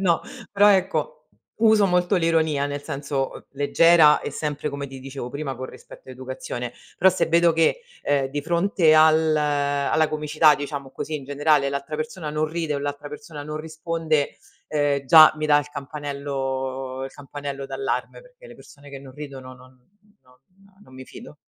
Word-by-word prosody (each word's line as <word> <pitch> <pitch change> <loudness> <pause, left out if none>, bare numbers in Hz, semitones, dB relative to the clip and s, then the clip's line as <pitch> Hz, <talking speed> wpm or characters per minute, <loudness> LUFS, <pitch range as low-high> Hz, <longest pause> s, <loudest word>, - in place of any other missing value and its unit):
No. 175 -4 +2 0.3
Però 205 0 +5
ecco, 200 - 0 0.3
uso 220 -2 +4
molto 180 +1 +1
l'ironia, 160 -5 +1
nel 145 0 -4
senso, 140 -1 -4
leggera 150 +2 +5
e - - -5
sempre 150 +1 -3
come 140 -1 -5
ti 135 0 -10
dicevo 135 -2 -7
prima 140 0 -5
con 130 +1 -6
rispetto - - -14
e - - -8
educazione. 125 -1 -6 0.2
Però 190 +1 +5
se - - 0
vedo 170 +1 +4
che, 165 - +2 0.2
ehm, 140 -2 +1
di 145 +2 -3
fronte 170 0 +2
al 155 0 +5
alla 145 +1 +1
comicità 155 0 +3
diciamo 145 -2 -6
così 155 +3 -4
in 140 - -9
generale 145 0 +2
l'altra 140 +2 -4
persona 155 0 -5
non 155 +1 -1
ride 160 -2 -3
o - - -2
l'altra 145 +1 -5
persona 150 -1 -9
non 150 +1 -6
risponde, 160 -1 -2 0.3
ehm, 145 -2 0
già 155 +3 +9
mi 155 0 -2
dà 145 -1 +5
il 145 - -4
campanello 135 -2 -4
il 135 - -7
campanello 140 -1 -7
d'allarme 415 - -3
perché - - -18
le - - -13
persone 145 0 -16
che 135 -1 -9
non 135 -1 -13
ridono 135 -3 -9
non 130 0 -18 0.5
non 125 0 -24 0.5
non 130 - -18
mi 130 - -10
fido. 150 - -12
145 Hz, 175 wpm, -23 LUFS, 140-160 Hz, 0.5 s, già